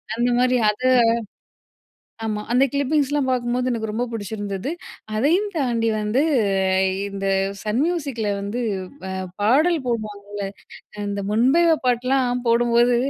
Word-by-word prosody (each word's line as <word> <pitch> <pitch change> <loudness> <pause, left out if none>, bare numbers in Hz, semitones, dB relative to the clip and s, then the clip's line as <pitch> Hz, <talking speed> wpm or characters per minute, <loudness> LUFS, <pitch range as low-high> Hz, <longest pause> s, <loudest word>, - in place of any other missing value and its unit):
அந்த 240 +1 +1
மாரி 250 0 +3
அத 210 +4 -3 1.4
ஆமா. 210 -1 -2
அந்த 250 +2 +4
கிளிப்பிங்ஸ்லாம் 285 -1 +1
பாக்கும்போது 250 0 0
எனக்கு 220 -2 -3
ரொம்ப 235 +3 -1
புடிச்சிருந்தது. 205 - -4 0.4
அதையும் 340 - +2
தாண்டி 240 -6 0
வந்து 210 +6 +1 0.9
இந்த 195 0 -5 0.4
சன் 215 +5 0
மியூசிக்கில 280 -11 -2
வந்து, 205 +5 -3 0.6
அ - - -3 0.2
பாடல் 305 +11 +3
போடுவாங்கல, 205 -3 -4 0.6
இந்த 200 0 -3
"முன்பேவா 310 +9 +4
பாட்லாம்" 250 0 +1
போடும்போது 240 +1 +3
240 Hz, 110 wpm, -22 LUFS, 215-270 Hz, 1.4 s, அந்த